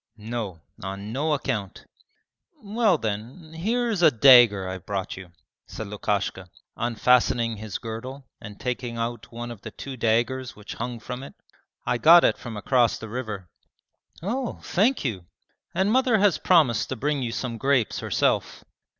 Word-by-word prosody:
'No, 105 -6 -5 0.2
on 100 +3 -6
no 150 +4 0
account.' 115 -9 -3 0.8
'Well 210 -3 +2
then, 120 - -5
here 230 +9 0
is 200 -5 -1
a 165 - +8
dagger 120 -7 +7
I've 95 -1 -6
brought 100 -2 -3
you,' 95 -2 -11 0.4
said 110 - -6
Lukashka, 100 -2 -2 0.3
unfastening 120 -1 +2
his 105 -2 -5
girdle 130 +4 -7 0.2
and 105 -1 -10
taking 125 -1 -3
out 115 +1 -4
one 120 +1 -6
of 110 -4 -10
the - - -7
two 135 +4 -8
daggers 120 +3 0
which 105 0 -9
hung 120 0 -5
from 125 +3 -6
it. 135 - -10 0.5
'I 125 - 0
got 170 +4 +8
it - - +2
from 115 -3 -7
across 120 +2 +2
the 110 - -9
river.' 110 -6 -5 0.8
'Oh, 240 +6 -3
thank 220 - +1
you!' 95 -8 -3 0.5
'And 190 +3 +2
mother 255 -2 +3
has 205 -3 +3
promised 155 -11 +3
to - - -2
bring 145 +3 -1
you 120 -2 -2
some 115 -1 -4
grapes 135 -5 +1
herself.' - - 0
120 Hz, 160 wpm, -25 LUFS, 110-145 Hz, 0.8 s, a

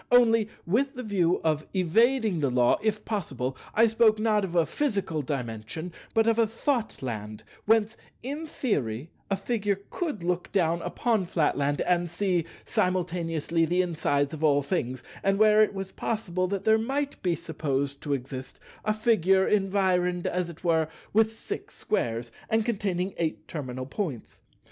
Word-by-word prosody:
Only, 230 -3 +5 0.2
with 265 +10 +1
the 250 - -5
view 185 -5 +2
of 155 -1 0
evading 220 +2 +3
the 140 -3 +1
Law, 125 -1 +3
if 215 0 -1
possible, 135 - -2 0.2
I 230 - +6
spoke 225 -1 +4
not 215 -1 +2
of 180 -2 -4
a 170 -2 +4
physical 200 - -1
Dimension, 130 +4 -4 0.2
but 225 0 +4
of 230 0 +3
a 225 - +4
Thoughtland 130 - -3 0.2
whence, 225 0 +3 0.3
in 290 +5 -4
theory, 145 - -2 0.2
a 195 - +2
Figure 205 -1 -1
could 300 - -3
look 180 0 -1
down 170 -3 +2
upon 200 +2 0
Flatland 145 -3 +1
and 175 -1 +1
see 175 -1 0 0.2
simultaneously 170 -3 0
the 175 +3 +2
insides 145 -4 0
of 160 0 -5
all 145 -2 +4
things, 130 -6 -2 0.2
and 195 0 +2
where 215 0 +6
it 215 - +3
was 195 0 -4
possible 185 -5 -2
that 195 +1 -2
there 220 +1 +4
might 275 +5 -2
be 175 -2 +1
supposed 140 -4 -2
to 145 - -1
exist 130 0 -7 0.2
a 215 - +1
Figure 195 -4 +3
environed, 185 -3 +1
as 180 -1 -1
it 170 +1 -12
were, 160 -2 +2 0.3
with 220 +1 +3
six 415 - -6
Squares, 115 - -1 0.2
and 220 0 +2
containing 195 -5 -1
eight 165 -2 -2
terminal 130 -4 -5
Points. 140 - -5
180 Hz, 160 wpm, -27 LUFS, 155-215 Hz, 0.3 s, I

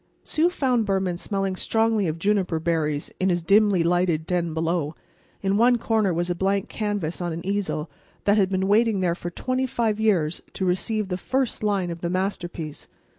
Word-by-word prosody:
Sue 320 +3 +2
found 250 -9 +1
Behrman 190 -3 0
smelling 195 -2 -2
strongly 225 0 +1
of 160 0 -2
juniper 185 -3 +1
berries 155 -3 -1
in 190 - +2
his 175 -2 0
dimly 200 -1 +4
lighted 170 -2 +1
den 175 -1 0
below. 160 -1 -1 0.5
In 195 +1 +2
one 240 +2 +5
corner 220 -4 +1
was 175 +1 0
a 175 - 0
blank 195 +2 0
canvas 205 -6 -2
on 175 -1 -2
an 170 +2 -5
easel 195 -5 -1 0.4
that 205 - +4
had 195 -3 +3
been 190 0 0
waiting 215 -1 +3
there 175 -2 +2
for 175 0 -5
twenty 255 +8 -1
five 225 -3 0
years 175 -8 +1
to 190 - -2
receive 200 +3 0
the 180 - -1
first 260 +5 -1
line 200 -4 0
of 170 0 -7
the 170 - -1
masterpiece. 175 -4 -3
190 Hz, 185 wpm, -24 LUFS, 170-210 Hz, 0.5 s, one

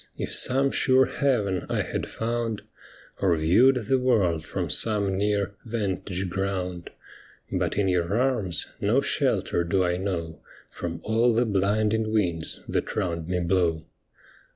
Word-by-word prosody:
if - - -2
some 135 +2 +3
sure 130 -1 +4
haven 105 - 0
I - - 0
had - - -4
found, 115 -1 -3 0.6
Or 90 -4 +3
viewed 115 +10 +4
the 130 +4 +2
world 100 -11 +1
from - - -3
some 105 -3 +2
near 100 0 0
vantage 100 -4 -3
ground; 90 -2 -3 0.6
But - - -1
in 100 -2 +2
your 90 +3 +1
arms 115 -10 0 0.2
no - - +3
sheher 85 - 0
do 95 +2 +1
I 90 0 0
know 85 -4 -4 0.3
From 85 -1 -5
all 115 +2 +2
the 120 +2 +3
blinding 110 +2 +1
winds 85 -7 -1
that - - -2
round 85 -2 -2
mc 90 -2 -1
blow. 85 -4 +1
100 Hz, 140 wpm, -25 LUFS, 90-115 Hz, 0.6 s, sure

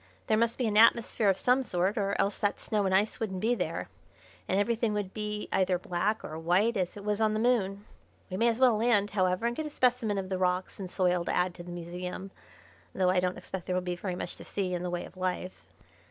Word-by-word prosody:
There 215 - +2
must 230 +1 +1
be 250 - 0
an 210 -2 +1
atmosphere 225 -1 +5
of 190 - +2
some 250 +5 +3
sort, 190 -4 0
or 200 -3 -1
else 200 0 +1
that 205 -1 0
snow 205 -2 0
and 190 - +2
ice 210 +5 +1
wouldn't 195 -5 -3
be 225 +5 +2
there, - - -3 0.6
and 190 - +1
everything 225 +1 +1
would 200 -2 -3
be 210 -1 -4
either 185 -1 +2
black 185 +5 -1
or 155 +1 -6
white 185 +8 +2
as 185 0 -2
it 200 - -8
was 210 +1 0
on 215 -1 +2
the - - 0
Moon. 210 -4 +1 0.4
We 185 - -5
may 230 - +3
as 230 0 +1
well 250 -4 +5
land, 210 -3 +2
however, 185 +1 +1
and 235 0 0
get 310 +2 -3
a - - -5
specimen 245 -7 +1
of 190 -1 -3
the 190 -1 -2
rocks 180 +1 0
and 190 -2 -5
soil 180 -1 +1
to - - -1
add 180 0 +1
to 175 - -10
the 175 - -10
museum, 180 +2 -6 0.6
though 185 -1 +3
I 185 - +3
don't 180 0 -1
expect 190 -3 -6
there 180 - 0
will 185 - 0
be 180 -1 -2
very 180 0 -4
much - - -5
to - - -10
see 190 -3 -2
in 175 - -2
the 180 - -3
way 175 0 -3
of 185 - -14
life." 185 0 -4
195 Hz, 250 wpm, -29 LUFS, 180-220 Hz, 0.6 s, atmosphere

